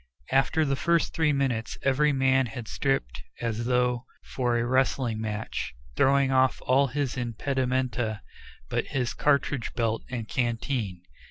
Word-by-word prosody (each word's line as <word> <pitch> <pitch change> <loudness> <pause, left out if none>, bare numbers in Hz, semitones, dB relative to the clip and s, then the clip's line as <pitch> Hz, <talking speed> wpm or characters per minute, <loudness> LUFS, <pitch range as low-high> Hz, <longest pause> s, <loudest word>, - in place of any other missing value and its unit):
After 145 +4 +3
the 135 -1 +1
first 170 +3 +1
three 160 -2 +2
minutes 130 -5 -1
every 140 +2 +3
man 135 -1 +3
had 115 0 -7
stripped 70 - -1 0.2
as 115 0 -2
though 125 0 +1 0.3
for 120 -2 +1
a 120 - 0
wrestling 125 -3 +1
match, 105 - -4 0.2
throwing 135 0 +3
off 130 0 +3
all 135 +2 +4
his 140 -1 -2
impedimenta 125 -2 -1 0.5
but - - -1
his 125 -3 0
cartridge 140 -4 +1
belt 115 -2 0
and 120 -4 -4
canteen. 115 -6 -2
125 Hz, 140 wpm, -27 LUFS, 115-135 Hz, 0.5 s, all